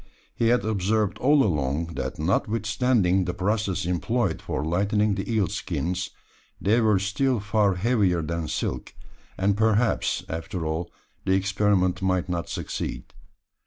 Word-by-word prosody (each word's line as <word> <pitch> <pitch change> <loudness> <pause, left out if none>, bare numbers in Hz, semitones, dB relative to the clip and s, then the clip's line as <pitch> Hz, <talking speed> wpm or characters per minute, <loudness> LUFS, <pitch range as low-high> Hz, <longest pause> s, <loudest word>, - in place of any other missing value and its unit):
He 115 - +1
had 115 -3 +3
observed 105 0 0
all 145 +2 +4
along, 75 -2 -1
that, - - -4
notwithstanding 105 +2 +1
the 90 - -3
process 100 -1 -1
employed 110 +8 0
for 75 - -3
lightening 100 +5 +1
the 95 +3 -3
eel 110 -3 +2
skins, 90 +1 -3 0.5
they 110 +5 +3
were 110 -3 +4
still 110 +6 0
far 105 -1 +1
heavier 95 -4 +2
than 85 0 -3
silk; - - -3 0.4
and 100 +1 +2
perhaps, 110 +2 +1
after 80 +1 -4
all, 80 +2 -3 0.3
the 95 - +2
experiment 95 -1 +1
might 95 -1 +1
not 85 -2 -3
succeed. - - -5
100 Hz, 135 wpm, -25 LUFS, 90-110 Hz, 0.5 s, all